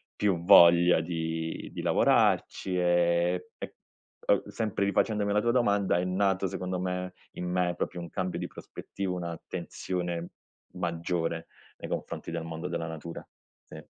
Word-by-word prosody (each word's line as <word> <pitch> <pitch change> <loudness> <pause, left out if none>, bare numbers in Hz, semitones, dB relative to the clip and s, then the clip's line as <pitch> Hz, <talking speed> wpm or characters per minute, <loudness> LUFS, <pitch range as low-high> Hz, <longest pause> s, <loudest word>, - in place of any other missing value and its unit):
più 95 -5 +1
voglia 85 -3 +8
di 80 -1 -3
di - - -4
lavorarci, 90 -1 +2
ehm, 85 0 +2 0.2
e - - -7 0.5
uhm, - - +4
sempre 105 -3 -1
rifacendomi 105 +1 +1
alla 105 - +3
tua 120 - +2
domanda, 100 -7 +2
è 90 - -1
nato 95 +1 +1
secondo 90 -1 -3
me, 90 0 -3 0.2
in 90 - -5
me, 90 -1 +1
proprio 90 - -3
un 85 - -7
cambio 90 0 -3
di - - -3
prospettiva, 95 -2 -6
un'attenzione 85 0 -4 0.5
maggiore 85 -1 -2 0.3
nei - - -7
confronti - - -4
del 85 -1 -3
mondo 80 +2 -5
della 85 -2 -3
natura. 80 +1 -7 0.4
Sì. - - -10
90 Hz, 140 wpm, -29 LUFS, 85-95 Hz, 0.5 s, voglia